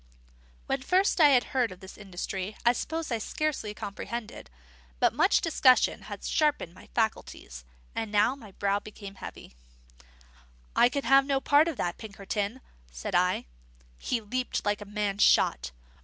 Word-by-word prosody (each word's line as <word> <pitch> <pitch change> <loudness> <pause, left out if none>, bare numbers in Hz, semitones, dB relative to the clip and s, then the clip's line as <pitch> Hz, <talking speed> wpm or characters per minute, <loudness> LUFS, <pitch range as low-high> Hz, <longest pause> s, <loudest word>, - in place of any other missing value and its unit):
When 270 0 -1
first 365 +5 +2
I 300 - +9
had 255 -3 +5
heard 250 -5 +1
of 185 - -11
this 190 0 -11
industry 195 0 -5
I 240 - +6
suppose 320 +3 -4
I 230 - 0
scarcely 245 -4 -3
comprehended; 215 - -6 0.5
but - - +3
much - - +3
discussion 265 -6 +3
had - - -7
sharpened 295 - 0
my - - -16
faculties, 215 - -3 0.3
and 220 -2 -3
now 210 +5 +3
my 220 -8 -14
brow 200 +1 0
became 205 -1 -10
heavy. - - -9 1.2
"I 240 - +6
can 280 +2 -3 0.2
be - - -12
no 275 -1 +1
party 290 +4 +4
to 325 - -4
that, 175 -6 -3
Pinkerton," 205 +2 -4 0.3
said - - -6
I. 180 +1 +2 0.5
He 245 - -1
leaped 250 +4 -3
like 205 0 0
a - - -7
man 205 -1 -2
shot. - - +4
215 Hz, 155 wpm, -28 LUFS, 200-265 Hz, 1.2 s, I